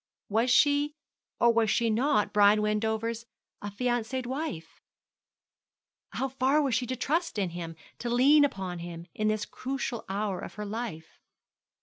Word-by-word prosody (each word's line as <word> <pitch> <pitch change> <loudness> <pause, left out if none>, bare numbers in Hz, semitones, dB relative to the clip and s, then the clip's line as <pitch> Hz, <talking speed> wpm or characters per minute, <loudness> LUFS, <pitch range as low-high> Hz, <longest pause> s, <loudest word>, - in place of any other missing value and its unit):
Was 225 +4 +2
she 290 +3 +3 0.4
or 235 -1 +5
was 225 -1 +2
she 230 +1 +2
not 245 0 +1
Brian 210 +1 +5
Wendover's 220 +2 -1 0.3
affianced 240 +4 -2
wife? 250 - -5 1.3
How 270 - -1
far 265 +2 +2
was 275 -4 +1
she 240 +2 0
to 255 - -2
trust 320 +4 -1
in 190 -4 0
him, 165 -1 -6 0.2
to 240 - -3
lean 275 +5 +5
upon 190 -10 -2
him, 170 0 -7
in 215 - -1
this 215 -1 0
crucial 260 -2 -4
hour 200 -1 -2
of - - -8
her 210 0 -5
life? 205 -7 -6
230 Hz, 145 wpm, -28 LUFS, 205-260 Hz, 1.3 s, or